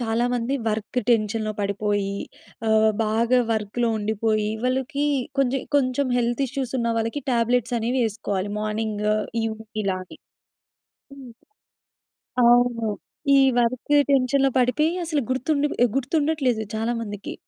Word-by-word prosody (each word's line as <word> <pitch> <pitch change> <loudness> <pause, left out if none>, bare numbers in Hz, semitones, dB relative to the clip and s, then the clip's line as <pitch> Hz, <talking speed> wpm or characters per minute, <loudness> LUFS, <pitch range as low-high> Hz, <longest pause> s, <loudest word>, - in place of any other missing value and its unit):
చాలా 230 0 0
మంది 245 +2 -1
వర్క్ 220 +3 -2
టెన్షన్‌లో 215 -1 +1
పడిపోయి, 200 0 -1 0.5
ఆహ్, 220 0 +4 0.2
బాగా 230 +3 +2
వర్క్‌లో 220 +2 -1
ఉండిపోయి, 215 0 0 0.2
వాళ్ళకి 265 +2 0 0.3
కొంచెం, 270 -1 +1
కొంచెం 265 0 +1
హెల్త్ 240 +2 0
ఇష్యూస్ 260 -1 -4
ఉన్న 235 -1 0
వాళ్ళకి 230 +6 -2
టాబ్లెట్స్ 240 0 +1
అనేవి 245 +3 0
యేసుకోవాలి. 205 -2 -3
మార్నింగు, 215 0 -1 0.3
ఈవు 220 -1 -3 0.3
ఇలానే. 185 -1 -4 1.0
హ్మ్. 265 -4 -11 1.2
అవును. 240 -2 +3 0.5
ఈ - - +6 0.2
వర్క్ 240 +4 -2 0.2
టెన్షన్‌లో 270 0 +3
పడితే 250 +5 +2 0.2
అసలు 310 -3 0
గుర్తుండ 280 +3 0 0.3
గుర్తుండట్లేదు 275 -3 0
చాలా 225 +2 -1
మందికి. 205 -2 -6
235 Hz, 115 wpm, -24 LUFS, 215-255 Hz, 1.2 s, ఈ